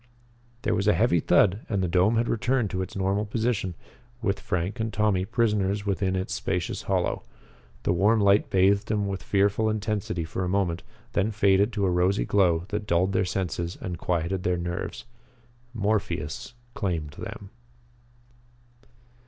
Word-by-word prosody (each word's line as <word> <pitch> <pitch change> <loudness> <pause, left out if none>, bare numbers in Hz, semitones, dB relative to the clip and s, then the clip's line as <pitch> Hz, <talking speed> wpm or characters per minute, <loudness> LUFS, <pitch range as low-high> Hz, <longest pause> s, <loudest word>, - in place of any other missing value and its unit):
There - - +1
was 100 - 0
a 105 - +5
heavy 110 -7 +3
thud 95 +6 +3
and 100 -3 0
the - - +1
dome 90 +6 +3
had 115 +1 +1
returned 120 -1 0
to 95 - -2
its 95 - -6
normal 95 +2 0
position, 110 -4 -1 0.4
with 100 -4 -1
Frank 90 +6 -2
and 110 0 -1
Tommy 105 -3 +1
prisoners 105 -3 0
within 95 -1 0
its 95 0 -2
spacious - - -2
hollow. - - +1 0.6
The - - +2
warm 105 +6 +3
light 100 0 +4
bathed 100 +2 +3
them 105 -2 0
with 95 -1 -3
fearful 100 +2 +2
intensity 105 -5 -2
for 80 +3 -4
a 90 - -1
moment, 90 -3 0 0.3
then 105 0 +2
faded 100 0 +3
to 100 -2 0
a 90 - +2
rosy 90 +3 +2
glow 90 -4 +2
that 105 0 -3
dulled 90 +2 +2
their 95 - +2
senses 90 -1 -3
and 90 -2 -5
quieted 90 +2 -1
their 90 -1 0
nerves. 85 +1 -4 0.7
Morpheus 110 +1 -2 0.2
claimed 85 -7 -2
them. 100 +7 -8
100 Hz, 160 wpm, -26 LUFS, 90-105 Hz, 0.7 s, a